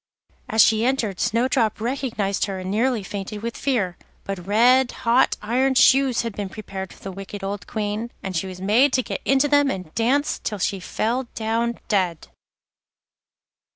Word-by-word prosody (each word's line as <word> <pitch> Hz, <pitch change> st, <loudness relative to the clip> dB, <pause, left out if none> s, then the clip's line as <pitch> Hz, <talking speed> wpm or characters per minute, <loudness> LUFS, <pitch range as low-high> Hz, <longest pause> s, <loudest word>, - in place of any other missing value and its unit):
As 220 Hz, 0 st, +6 dB
she 220 Hz, 0 st, +3 dB
entered 235 Hz, -7 st, 0 dB
Snowdrop 230 Hz, -1 st, +1 dB
recognised 230 Hz, -5 st, -1 dB
her, 195 Hz, -2 st, -4 dB
and 185 Hz, 0 st, -5 dB
nearly 230 Hz, +1 st, +1 dB
fainted 205 Hz, +2 st, -6 dB
with 235 Hz, 0 st, -3 dB
fear; 210 Hz, -11 st, -1 dB, 0.2 s
but 190 Hz, -2 st, -6 dB
red 245 Hz, +5 st, +4 dB
hot 235 Hz, +3 st, +3 dB
iron 260 Hz, +5 st, +1 dB
shoes 265 Hz, -2 st, +4 dB
had 230 Hz, -3 st, -5 dB
been 200 Hz, -2 st, -4 dB
prepared 190 Hz, -2 st, -7 dB
for -, -, -16 dB
the 195 Hz, -, -5 dB
wicked 195 Hz, +1 st, -8 dB
old 200 Hz, 0 st, -4 dB
Queen, 215 Hz, +1 st, -3 dB
and 190 Hz, -1 st, -4 dB
she 170 Hz, +3 st, -1 dB
was 185 Hz, -1 st, -8 dB
made 230 Hz, +8 st, +3 dB
to 255 Hz, -, +2 dB
get -, -, -5 dB
into 270 Hz, +2 st, +3 dB
them 285 Hz, -1 st, +4 dB
and 185 Hz, -8 st, -5 dB
dance 260 Hz, +7 st, +1 dB
till 210 Hz, -, -2 dB
she 195 Hz, 0 st, -1 dB
fell 235 Hz, +7 st, -2 dB
down 230 Hz, +1 st, -1 dB
dead. 185 Hz, -6 st, 0 dB
220 Hz, 170 wpm, -23 LUFS, 195-250 Hz, 0.2 s, As